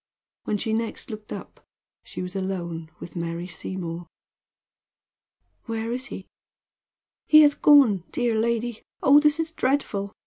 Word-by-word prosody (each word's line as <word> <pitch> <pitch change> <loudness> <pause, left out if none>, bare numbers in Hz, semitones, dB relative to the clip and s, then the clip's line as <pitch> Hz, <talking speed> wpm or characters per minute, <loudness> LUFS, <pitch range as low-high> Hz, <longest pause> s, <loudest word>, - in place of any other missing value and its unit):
When 210 - 0
she 220 +2 -2
next 230 +1 -3
looked 215 -1 -9
up - - -9 0.4
she - - -7
was 180 +1 -7
alone 170 -4 -4
with - - -10
Mary 170 0 -3
Seymour. 175 -2 -6 1.6
"Where 225 0 -3
is 255 +2 -3
he?" - - -8 1.0
"He 310 0 +8
has 290 -1 +5
gone, 265 - +5
dear 240 -2 0
lady. 230 +1 -1 0.2
Oh, 285 +2 +7
this 300 +1 +3
is 325 0 -1
dreadful! 255 -10 -1
220 Hz, 135 wpm, -25 LUFS, 185-255 Hz, 1.6 s, He